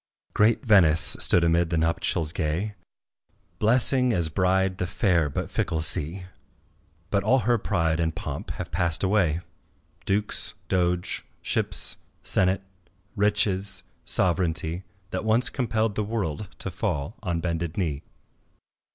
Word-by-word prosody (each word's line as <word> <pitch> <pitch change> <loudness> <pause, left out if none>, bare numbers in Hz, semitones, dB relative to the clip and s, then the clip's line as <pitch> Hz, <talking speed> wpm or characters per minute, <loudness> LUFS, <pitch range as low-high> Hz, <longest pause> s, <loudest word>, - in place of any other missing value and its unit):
Great 110 +5 +2
Venice 85 -8 +5
stood 85 - +3
amid 85 0 +2
the 85 - -1
nuptials 80 0 0
gay 85 +6 -2 0.9
Blessing 125 +3 +4
as 85 -5 0
bride 95 +2 +1
the 90 - -1
fair 85 -5 +1
but - - -4
fickle 80 -1 -2
sea; 80 +4 0 0.9
But 100 - +2
all 130 0 +3
her 120 0 +1
pride 85 -6 0
and 80 -1 -1
pomp - - -6
have - - -7
passed 85 +1 0
away, 95 -5 +1 0.7
Dukes, 105 +2 0
doge, 90 -1 0 0.2
ships, - - +1 0.3
senate, 95 +2 +2 0.5
riches, 100 -2 +1 0.2
sovereignty, 85 -1 0 0.3
That - - -3
once 115 +3 +2
compelled 115 -4 -1
the 105 - -1
world 105 -4 -3
to - - -5
fall 70 +8 -3
on 85 -5 -2
bended 85 -1 -3
knee. 80 -7 -2
90 Hz, 125 wpm, -25 LUFS, 80-105 Hz, 0.9 s, Venice